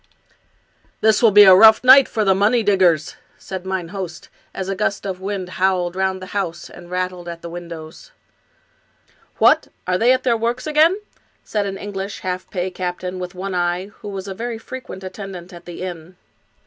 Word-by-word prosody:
This 220 -1 +3
will 230 - +6
be 205 0 +8
a 190 -2 +9
rough 220 +5 +7
night 260 +1 +8
for 215 -2 -1
the 195 - +5
money 215 +5 +2
diggers," 185 -7 +2 0.2
said 190 -1 -7
mine 190 -3 -3
host, 180 -3 -7 0.2
as 190 - -5
a 195 - -1
gust 195 +1 -2
of 190 -2 -4
wind 195 -1 -4
howled 185 -2 +1
round 190 0 -1
the 185 - -10
house 180 -4 -4
and 175 0 -13
rattled 180 -1 -3
at 170 -1 -8
the 170 - -6
windows. 170 - -9 0.7
" - - -37
What! - - +4 0.2
are 180 0 0
they 240 +2 +4
at 260 0 +2
their 240 -3 +2
works 235 +2 -2
again? 315 +6 +3 0.2
" - - -40
said 205 -2 -2
an 195 0 -5
English 200 0 -6
half 185 0 -4
pay 185 -1 -3
captain, 180 0 -4
with 180 0 -6
one 190 +1 -5
eye, 175 +2 -1
who - - -9
was 195 -1 -6
a 195 - -4
very 230 +3 -5
frequent 225 -4 -9
attendant 190 -1 -8
at 175 0 -12
the 175 +1 -8
inn. 175 -1 -7
190 Hz, 195 wpm, -20 LUFS, 180-205 Hz, 0.7 s, a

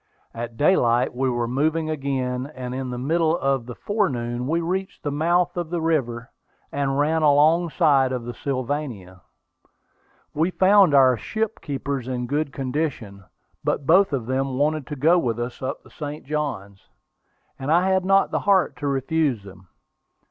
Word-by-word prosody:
At 115 0 -6
daylight 125 -6 +3
we 130 +1 0
were 120 -1 -1
moving 155 +6 0
again, 135 -3 -2
and 125 -1 -5
in 130 0 -4
the 125 - -4
middle 160 +5 +1
of 135 -5 -1
the 120 - -7
forenoon 125 - -2
we 165 +3 +1
reached 185 +3 -3
the 145 - -2
mouth 175 +4 +1
of 175 -2 -3
the 175 0 -2
river, 125 -8 -1 0.4
and 140 -1 -1
ran 155 +3 +2
alongside 150 -2 +3
of 125 -2 -3
the 120 +1 -6
Sylvania. 125 - -4 1.1
We 160 +4 +1
found 190 -4 +5
our 130 -3 +5
ship 220 - -3
keepers 140 -3 -4
in 125 -1 -3
good 145 +2 -1
condition; 130 -8 -4 0.4
but 140 - -1
both 185 +5 +5
of 130 -5 -2
them 130 +1 -1
wanted 150 0 0
to 150 - -5
go 160 +6 +4
with 120 -6 -1
us 120 +1 -5
up 130 +1 -4
the - - -18
St. 150 0 -7
Johns, 130 -10 -4 0.7
and 135 +3 -2
I 175 +3 +4
had 190 -1 +2
not 195 +1 +3
the - - 0
heart 195 -3 +2
to 145 - -3
refuse 135 -3 0
them. 95 -2 -14
140 Hz, 165 wpm, -23 LUFS, 125-160 Hz, 1.1 s, found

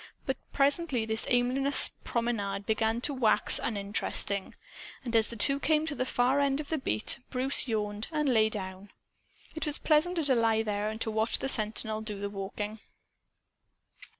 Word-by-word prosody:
But 265 - -1
presently 280 -3 +1
this 220 0 0
aimless 255 +3 +3
promenade 205 -4 -2
began 220 +2 0
to 285 - -2
wax 245 -5 +3
uninteresting. 200 -1 -2 0.5
And, 235 -1 -3
as 220 -2 +4
the 235 - -5
two 275 +6 +3
came 305 +2 +2
to 315 - -3
the 255 -2 -2
far 255 +3 +2
end 280 0 +1
of 300 - -6
the 320 - -1
beat, 110 - 0
Bruce 265 +2 +1
yawned 210 -2 -2
and 300 -2 0
lay 220 -4 +4
down. 190 -1 -5 0.6
It 315 -1 -3
was 295 - +2
pleasanter 330 +2 +2
to 275 -2 +3
lie 225 -2 +2
there 210 -1 -2
and 220 0 -6
to 220 - -1
watch 220 +1 +2
the - - -3
sentinel 215 -2 0
do 210 -2 -5
the 200 0 -4
walking. 205 +2 -5
230 Hz, 170 wpm, -29 LUFS, 210-275 Hz, 0.6 s, as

